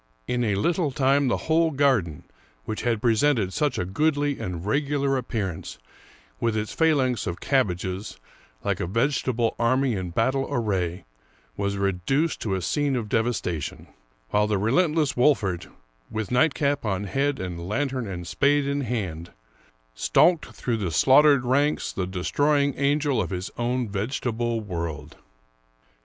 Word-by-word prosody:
In 125 0 0
a 105 -4 +1
little 165 - +1
time 135 +1 +2
the 120 - -1
whole 165 +1 +3
garden, 130 - +1 0.4
which 110 - -4
had 115 -3 -1
presented 115 -4 +2
such 145 -3 0
a 90 - -1
goodly 145 - 0
and 90 -1 -5
regular 140 +3 0
appearance, 105 - -4 0.6
with 115 -2 0
its 105 0 -3
phalanx 135 -8 +2
of 90 0 -4
cab 135 -5 +2
bages, 95 +3 -5 0.5
like - - -1
a - - -2
vegetable 115 +1 0
army 130 +2 +2
in 95 -3 -3
battle 130 +9 0
array, 95 -8 -1 0.5
was 100 0 -2
reduced 100 - 0
to 100 -4 -1
a 95 - -3
scene 145 - 0
of 115 -4 -3
devastation, 110 -9 -2 0.5
while 105 0 +3
the 105 -1 +1
relentless 150 - +2
Wolfert, 120 - +2 0.4
with 110 -1 -4
nightcap 145 +1 +2
on 100 -2 -1
head 135 +6 -1
and 90 -1 -5
lantern 130 0 -1
and 90 -3 -6
spade 145 +8 +2
in 140 +1 -1
hand, 95 - -3 0.6
stalked 160 - +3
through 120 -2 -3
the 100 -5 -2
slaughtered 135 - +5
ranks, 140 +4 +1
the 90 -2 -2
destroying 140 +10 +1
angel 140 -3 +1
of 85 - -3
his 90 0 -4
own 120 0 -1
vegetable 115 +2 -2
world. 85 -6 -5
120 Hz, 145 wpm, -25 LUFS, 95-140 Hz, 0.6 s, slaughtered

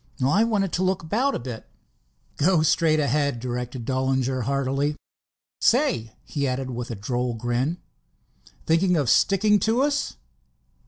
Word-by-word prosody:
"I 185 +11 +4
wanted 205 -5 0
to 185 - 0
look 185 -2 0
about 240 - 0
a - - -2
bit." 120 - -7 0.7
"Go 170 +1 +3
straight 155 0 +3
ahead," 140 -2 0
directed 125 0 -5
Dollinger 130 -1 0
heartily. 140 +2 0 0.6
"Say," 115 -1 +2
he 140 -2 -2
added, 130 0 -3
with 120 +1 -5
a 115 - -4
droll 120 +4 -2
grin, 120 +8 -1 0.9
"thinking 175 +2 +3
of 135 -7 +2
sticking 205 - +4
to 230 +6 +2
us?" 285 0 -1
140 Hz, 140 wpm, -24 LUFS, 125-180 Hz, 0.9 s, I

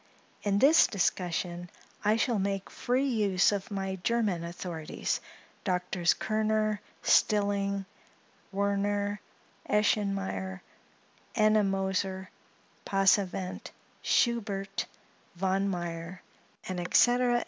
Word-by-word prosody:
In 200 -1 +1
this 290 +9 +6
discussion, 175 -3 -1 0.3
I 210 +1 +4
shall 230 -1 +1
make 195 0 -2
free 255 +3 0
use 205 -7 +3
of 200 +2 -3
my 195 -2 -3
German 205 -3 0
authorities, 170 -2 -4 0.4
Doctors 180 -2 +1
Kerner, 215 -1 0 0.2
Stilling, 200 -1 +2 0.7
Werner, 200 +1 0 0.5
Eschenmayer, 195 -2 0 0.7
Ennemoser, 195 -3 +1 0.5
Passavent, 195 -1 +1 0.3
Schubert, 200 -5 0 0.5
Von 190 +2 0
Meyer, 175 -1 -5 0.4
&c., 180 -2 -4
&c. 245 0 +5
195 Hz, 80 wpm, -29 LUFS, 185-215 Hz, 0.7 s, this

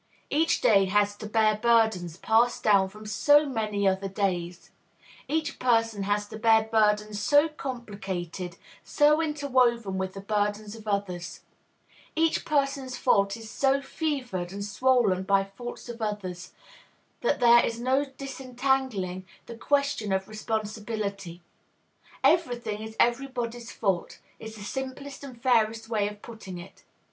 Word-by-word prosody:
Each 320 +3 +2
day 195 -3 +5
has 205 +1 +2
to 215 - -7
bear 215 -1 +2
burdens 220 -7 +2
passed 230 +4 +2
down 200 -3 +4
from 210 +2 -13
so 290 +8 +4
many 215 -6 -1
other 190 +1 +1
days; 180 -3 -3 0.6
each 315 +1 -2
person 225 -4 +2
has 205 +1 0
to 220 - -8
bear 220 -1 +5
burdens 210 -1 +1
so 290 +8 +5
complicated, 195 - -6 0.3
so 300 +1 +3
interwoven 250 -10 +1
with 190 0 -3
the 195 - -6
burdens 210 +1 -1
of 220 -1 -12
others; 180 -4 -3 0.7
each 325 0 +1
person's 275 -3 -1
fault 200 -3 +2
is 225 -1 -10
so 275 0 +2
fevered 265 - -3
and 200 +1 -5
swollen 220 -3 +2
by 195 +1 +2
faults 240 +7 -9
of 235 -1 -8
others, 185 -4 -4 0.7
that - - +1
there 240 -1 +7
is 230 0 -2
no 260 +3 +2
disentangling 260 -8 -2 0.2
the 235 - -9
question 280 -4 0
of 190 0 0
responsibility. 215 -4 -4 0.8
Every 330 -8 +3
thing 215 -3 -5
is 220 0 -8
everybody's 240 -2 -1
fault 190 -5 -1 0.2
is 220 0 -8
the 210 - -9
simplest 265 +5 -6
and 255 -4 -10
fairest 225 -2 +1
way 210 -3 +1
of 210 0 -9
putting 210 -6 -9
it. 175 +3 -12
220 Hz, 140 wpm, -27 LUFS, 200-255 Hz, 0.8 s, there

